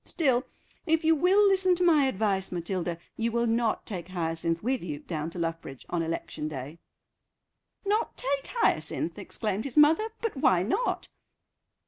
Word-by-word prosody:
Still, 265 -7 +1 0.4
if 320 0 +2
you 320 +1 +5
will 375 +6 +4
listen 375 -2 +4
to 360 - 0
my 310 -5 +5
advice, 200 -6 0
Matilda, 175 -1 -2 0.2
you 230 +1 0
will 235 +1 +1
not 230 -1 0
take 180 -5 -5
Hyacinth 165 -1 -2
with 255 -1 0
you 150 -4 -4
down 155 +1 -4
to 170 - -10
Luffbridge 165 -5 -4
on 170 - 0
election 160 -2 -3
day." 145 +2 -7 1.1
"Not 420 +3 0
take 275 +1 -1
Hyacinth!" 475 -2 0
exclaimed 210 -1 -3
his 275 +1 -6
mother; 320 +9 +5
"but 455 -6 -2
why 185 -9 +3
not? 400 - -1
225 Hz, 155 wpm, -28 LUFS, -, 1.1 s, you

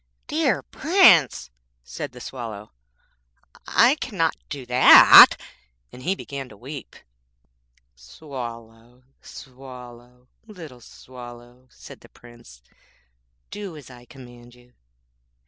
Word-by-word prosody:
'Dear 305 -3 -2
Prince,' 270 - +2 0.3
said 140 - -9
the 125 - -14
Swallow,'I 100 - -5
cannot 165 -9 -2
do 140 -3 -8
that;' 125 +1 +7 0.5
and 125 - -14
he 185 +9 -2
began 140 -7 -9
to 105 - -17
weep. 135 +6 -11 1.0
'Swallow, 115 - -12 0.2
Swallow, 125 -2 -15 0.2
little 160 - -13
Swallow,' 120 +1 -15
said - - -16
the - - -20
Prince, 120 - -19 0.9
'do 200 -6 -9
as 135 -3 -15
I 120 -1 -16
command 120 -1 -17
you.' 125 0 -25
125 Hz, 95 wpm, -21 LUFS, 120-140 Hz, 1.0 s, that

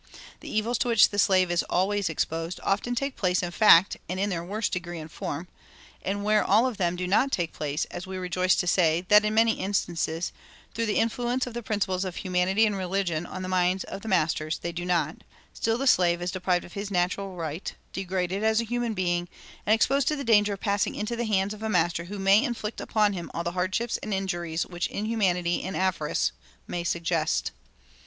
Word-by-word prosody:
The - - -9
evils 225 +2 0
to 250 - 0
which 230 -2 +6
the 205 - -3
slave 185 -3 +4
is 175 - +2
always 195 +1 +1
exposed 165 +2 -2
often 225 +5 0
take 275 +2 -2
place 180 -1 +1
in 175 - -3
fact, 195 -1 +6
and 185 +1 -3
in 200 +1 0
their 170 -2 -2
worst 205 +4 -2
degree 175 -2 -4
and 155 0 -8
form; 165 +5 -5 0.5
and 200 +2 -2
where 210 0 +3
all 215 +5 +4
of 250 -5 -2
them 175 -2 0
do 180 +1 -3
not 235 +9 +3
take 170 -7 -1
place, 150 +1 -2
as 175 +1 -6
we 190 0 -5
rejoice 185 0 +1
to - - 0
say 170 -1 +2
that 210 0 +7
in 215 0 0
many 225 0 +3
instances, 175 -4 -1 0.4
through 230 0 -1
the 210 - 0
influence 240 +3 0
of 250 - -7
the 240 - -4
principles 195 -4 -1
of 185 -2 -5
humanity 185 +4 +2
and 205 -2 0
religion 180 -3 -1
on 185 0 -6
the - - -4
minds 185 +1 +1
of 195 - -8
masters, 160 -6 0
they 170 - -4
do 175 +1 -5
not, 175 -2 0 0.4
still 225 0 0
the 270 - -2
slave 175 -8 +4
is 175 +1 -2
deprived 180 -1 0
of 175 - -14
his 200 0 -4
natural 185 +1 -1
right, 165 0 -5 0.2
degraded 190 +1 -2
as 220 0 +3
a - - +1
human 240 -1 -2
being, 175 -2 -1 0.4
and 215 - +6
exposed 270 +4 +2
to 305 - +2
the 280 - -4
danger 210 -4 +4
of 195 - -7
passing 200 -1 0
into 215 +3 -3
the 235 0 -2
hands 200 -1 +1
of 215 - -11
a 220 - -2
master 170 -3 +1
who 205 +3 -7
may 195 +4 +4
inflict 235 -5 -3
upon 210 -2 +2
him 175 -3 -5
all 170 - -2
the 170 - -2
hardships 185 +6 -1
and 210 -2 -2
injuries 175 -4 -2
which 175 -1 -3
inhumanity 190 -5 0
and 190 - -4
avarice 185 -5 0 0.3
may 175 - -4
suggest. 170 -2 0
190 Hz, 215 wpm, -27 LUFS, 175-215 Hz, 0.5 s, that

